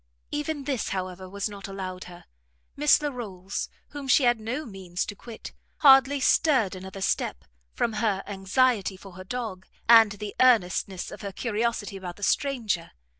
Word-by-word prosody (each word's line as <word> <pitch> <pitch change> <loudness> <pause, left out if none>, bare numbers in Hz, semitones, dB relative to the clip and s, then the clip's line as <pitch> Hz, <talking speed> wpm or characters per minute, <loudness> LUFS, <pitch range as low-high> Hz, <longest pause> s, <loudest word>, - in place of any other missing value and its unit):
Even 295 0 -2
this, 270 -5 -2
however, 185 -1 -4
was 200 +2 -2
not 200 -1 -8
allowed 185 -2 -6
her; 175 -1 -12 0.5
Miss 295 0 +5
Larolles, 205 -9 -4 0.2
whom 285 -2 -7
she 265 +2 +5
had 240 -2 +3
no 250 +8 -4
means 190 -5 -4
to 205 - -7
quit, 225 +2 -10 0.2
hardly 275 0 +6
stirred 265 - +3
another 190 +1 -8
step, 125 - -1 0.3
from 230 - 0
her 210 -3 0
anxiety 200 +1 +1
for 195 +1 -12
her 185 +1 -10
dog, 205 -4 -5 0.2
and 225 -3 +8
the 205 0 -6
earnestness 195 -6 +2
of - - -9
her 200 -2 -5
curiosity 220 -1 -2
about 180 -2 -7
the 205 - -11
stranger. 230 - 0
205 Hz, 160 wpm, -26 LUFS, 190-250 Hz, 0.5 s, and